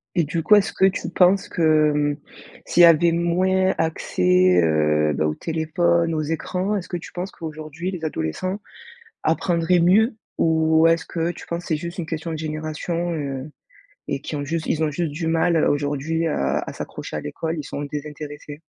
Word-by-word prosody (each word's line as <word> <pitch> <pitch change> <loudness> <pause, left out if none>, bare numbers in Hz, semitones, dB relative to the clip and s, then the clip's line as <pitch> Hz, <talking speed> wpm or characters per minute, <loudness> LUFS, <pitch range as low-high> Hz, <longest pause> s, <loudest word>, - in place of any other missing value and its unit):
Et 170 - +3
du 160 +2 -2
coup, 210 +6 +6
est-ce 205 0 +2
que 190 - +3
tu 190 -2 0
penses 185 +2 +3
que, - - -4 0.3
mmh, 145 -1 0 0.5
s'il 175 - +3
y - - +12
avait 170 0 +5
moins 185 +3 +2
accès, 90 - +2
heu, 75 -1 +2
bah, 75 +2 0
au 75 - -2
téléphone, 165 - 0
aux 155 - 0
écrans, 180 +6 -2
est-ce 190 -3 -4
que 175 - -2
tu 170 - -10
penses 180 +2 -5
qu'aujourd'hui 155 +2 -6
les 175 -4 -7
adolescents 160 - -3 0.6
apprendraient 170 +1 +2
mieux? 215 +7 +4 0.2
Ou 160 0 +3
est-ce 165 0 +3
que 165 0 -2
tu - - -12
penses 170 +1 -4
c'est 160 - 0
juste 170 +4 -7
une 170 - -3
question 160 +1 -4
de 160 - -4
génération, 155 +2 -3
heu? 140 -2 -4 0.6
Et 140 - -2
qui 150 - -5
ont 145 - -3
juste 160 +2 -3
ils 160 - 0
ont 150 - 0
juste 165 +1 -2
du 160 +2 -4
mal 165 +1 +2
à 155 - +3
aujourd'hui 145 +3 -1
à 70 - 0
à - - -7
s'accrocher - - -7
à - - -2
l'école, 160 - -4
ils 150 - -5
sont 140 - -5
désintéressés? 150 0 -7
160 Hz, 190 wpm, -22 LUFS, 150-175 Hz, 0.6 s, y